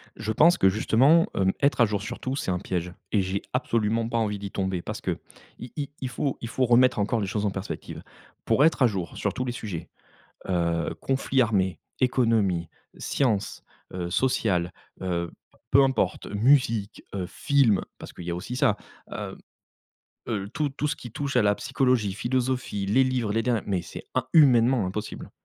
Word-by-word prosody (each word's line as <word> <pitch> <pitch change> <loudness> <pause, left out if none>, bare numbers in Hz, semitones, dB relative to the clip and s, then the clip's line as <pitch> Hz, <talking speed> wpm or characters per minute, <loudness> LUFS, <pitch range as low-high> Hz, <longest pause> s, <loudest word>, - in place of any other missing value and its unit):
Je 110 0 -3
pense 170 +10 +5
que 95 - +5
justement, 130 - +4
hem, 95 -1 +3
être 140 -3 +3
à - - +8
jour 105 -2 -2
sur 120 +3 -6
tout 130 +1 -3
c'est 95 - -2
un 90 - -1
piège 90 -2 -3 0.2
et 105 - +3
j'ai 95 +1 -2
absolument 115 -3 0
pas 115 0 -1
envie 105 -3 -1
d'y 100 -1 -6
tomber. 95 -2 -2
Parce - - -6
que - - -2 0.4
i 125 - -8
i 145 -1 -3
il 130 - -2
faut 135 +2 -2
il 115 - -4
faut 130 +2 0
remettre 125 0 +4
encore 110 +3 +1
les 100 - -2
choses 105 +2 -1
en 100 - +1
perspective. 95 +1 -6 0.4
Pour 140 - +3
être 160 - +2
à 125 - +7
jour 95 -6 -4
sur - - -1
tous 125 - -3
les 120 - -2
sujets, 100 -9 -6 0.6
heu, 85 -3 0
conflits 135 -1 +1
armés, 95 -5 0 0.2
économie, 115 - +2 0.3
sciences, 110 -8 -1 0.3
heu, 90 -1 -4
sociales, 90 -7 +1 0.3
heu, 85 -2 -2 0.4
peu 140 +2 +6
importe, 130 -9 0
musique, 115 -1 +2
heu, 95 -3 -2
films, 135 -6 +2 0.2
parce - - -10
qu'il 90 - -10
y 85 - -3
a 85 - -1
aussi 100 +8 -5
ça, 105 -4 +3 0.4
heu - - -5 0.9
heu, 100 -4 -2
tout 150 +4 -1
tout 140 +2 -3
ce 150 - 0
qui 120 - -9
touche 140 +3 -3
à 125 - +5
la 105 0 +3
psychologie, 125 -7 +1
philosophie, 125 -2 -1
les 130 +7 +4
livres, 125 -5 0
les 115 +1 +1
der 120 -1 +1
mais 95 -4 -1
c'est - - -9
im 130 - +1
humainement 125 - +5
impossible. 105 +3 -5
110 Hz, 190 wpm, -26 LUFS, 95-130 Hz, 0.9 s, à